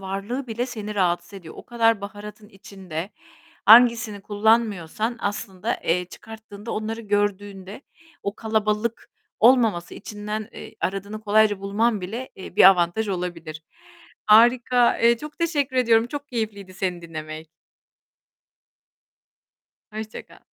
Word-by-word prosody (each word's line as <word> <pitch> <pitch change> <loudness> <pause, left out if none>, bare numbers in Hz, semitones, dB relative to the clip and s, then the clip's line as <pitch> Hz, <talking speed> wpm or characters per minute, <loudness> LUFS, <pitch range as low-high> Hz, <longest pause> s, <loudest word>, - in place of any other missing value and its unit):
varlığı 200 +8 -4
bile 235 +2 -3
seni 215 -4 -6
rahatsız 180 -1 0
ediyor. 170 -5 -10
O - - -11
kadar 230 -3 +2
baharatın 210 +1 -9
içinde 190 -3 -8 0.6
hangisini 230 -2 +6
kullanmıyorsan 215 0 0
aslında, 200 +1 -3
eee, 180 +2 +1
çıkarttığında 220 +2 -11
onları 220 +1 -4
gördüğünde 205 -1 -2 0.4
o 200 +1 -3
kalabalık 220 0 -2 0.3
olmaması, 225 -7 +3
içinden, 210 +1 -6
eee, - - -10
aradığını 200 +3 -3
kolayca 210 -1 +3
bulman 210 +2 0
bile, 225 +8 -6
eee, 190 - -11
bir - - +7
avantaj 180 +4 0
olabilir. 170 -4 -5 0.6
Harika! 240 +2 +5
Eee, 235 0 +4
çok 300 0 -10
teşekkür 290 -6 -1
ediyorum. 230 -2 +4
Çok 285 +2 -7
keyifliydi 205 -5 -5
seni 180 -2 -3
dinlemek. 155 -1 -8 2.4
Hoşça 215 0 -7
kal. - - -19
210 Hz, 115 wpm, -23 LUFS, 195-230 Hz, 2.4 s, bir